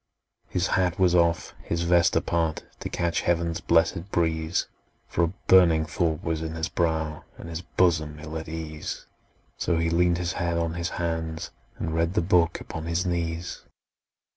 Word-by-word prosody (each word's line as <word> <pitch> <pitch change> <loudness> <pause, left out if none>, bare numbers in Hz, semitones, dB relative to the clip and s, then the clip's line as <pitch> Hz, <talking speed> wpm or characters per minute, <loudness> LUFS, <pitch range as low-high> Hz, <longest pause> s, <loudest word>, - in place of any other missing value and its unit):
His 90 -1 0
hat 90 -2 +1
was 90 -2 +4
off, 85 -1 +2
his 85 0 -2
vest 85 0 +4
apart, 80 -2 0 0.2
To - - -4
catch 85 -1 0
heaven's 85 -1 0
blessed 85 +3 +2
breeze; 80 -1 0 0.4
For 85 - +1
a 85 - -4
burning 85 -4 +6
thought 85 -2 -1
was 80 -1 -1
in 80 0 -4
his 80 +1 -2
brow, 80 -3 -1
And - - -9
his 85 0 -4
bosom 80 -4 +1
ill 80 0 -7
at 80 0 -5
ease: 80 -1 -5 0.5
So 85 - +1
he 80 0 +1
leaned 85 0 +3
his 90 0 -2
head 85 -1 -1
on 85 -1 0
his 85 0 -2
hands, 80 -1 -3 0.3
and 80 - -3
read 85 +3 0
The - - +3
book 85 -2 +3
upon 80 0 -6
his 85 +2 0
knees! 85 -1 -2
85 Hz, 170 wpm, -26 LUFS, 80-85 Hz, 0.5 s, burning